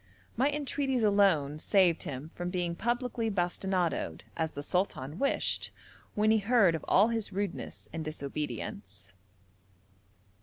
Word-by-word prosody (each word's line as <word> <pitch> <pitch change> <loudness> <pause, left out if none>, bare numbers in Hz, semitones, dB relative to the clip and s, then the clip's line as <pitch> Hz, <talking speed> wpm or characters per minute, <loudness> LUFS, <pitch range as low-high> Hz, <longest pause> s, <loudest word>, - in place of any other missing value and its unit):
My 265 +5 +3
entreaties 280 -3 -1
alone 185 -9 +3
saved 180 -2 +3
him 140 +3 -6
from 175 0 -4
being 175 -2 -1
publicly 240 +1 -1
bastinadoed, 180 -2 -1
as 160 -1 0
the 145 -1 -7
sultan 165 -4 -2
wished, 275 - +1 0.5
when 215 +1 +3
he 220 - +4
heard 210 -4 +4
of 160 - -3
all 210 +4 +5
his 225 -3 -2
rudeness 200 -1 -4
and 165 -1 -3
disobedience. 150 -9 -6
190 Hz, 125 wpm, -30 LUFS, 160-225 Hz, 0.5 s, all